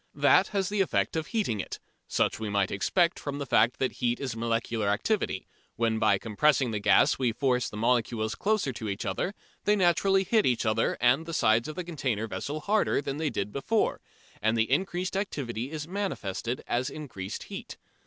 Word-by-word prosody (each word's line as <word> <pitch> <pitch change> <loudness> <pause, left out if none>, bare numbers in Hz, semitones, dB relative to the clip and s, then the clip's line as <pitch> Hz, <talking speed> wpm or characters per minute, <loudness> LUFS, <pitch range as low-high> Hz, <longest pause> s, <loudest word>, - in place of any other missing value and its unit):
That - - +5
has 195 -2 -1
the 205 -1 +1
effect 190 - 0
of 160 -1 -2
heating 205 - -1
it. - - -5 0.3
Such - - 0
we 110 -1 -3
might 100 -2 +1
expect 170 - +1
from 145 -1 -4
the 140 - -3
fact 120 -1 +3
that 130 - 0
heat 120 -1 +1
is 130 -5 -3
molecular 115 -1 -1
activity: 115 - 0 0.3
when 115 -1 +1
by 105 -3 +4
compressing 125 +4 +2
the 105 - -1
gas 100 - +4
we 125 -3 +2
force 125 0 0
the 105 - -8
molecules 115 -1 +1
closer 205 -10 0
together, 110 - -3 0.3
they 210 - +4
naturally 190 +1 +3
hit 215 +3 +2
each 120 -2 +1
other 110 +1 +1
and 130 +7 +3
the 165 - -3
sides 110 +2 +3
of 155 - -6
the 180 - -3
containing 130 -10 -2
vessel 150 +6 -4
harder 210 +5 +2
than 140 0 -3
they 155 -1 0
did 100 -5 -3
before, 210 - 0 0.4
and 110 +1 +2
the 110 +2 +1
increased 185 +4 0
activity 130 - -3
is 155 -1 -5
manifested 130 - -3
as 125 +3 -1
increased 110 -11 -6
heat. - - -8
130 Hz, 185 wpm, -28 LUFS, 110-170 Hz, 0.4 s, That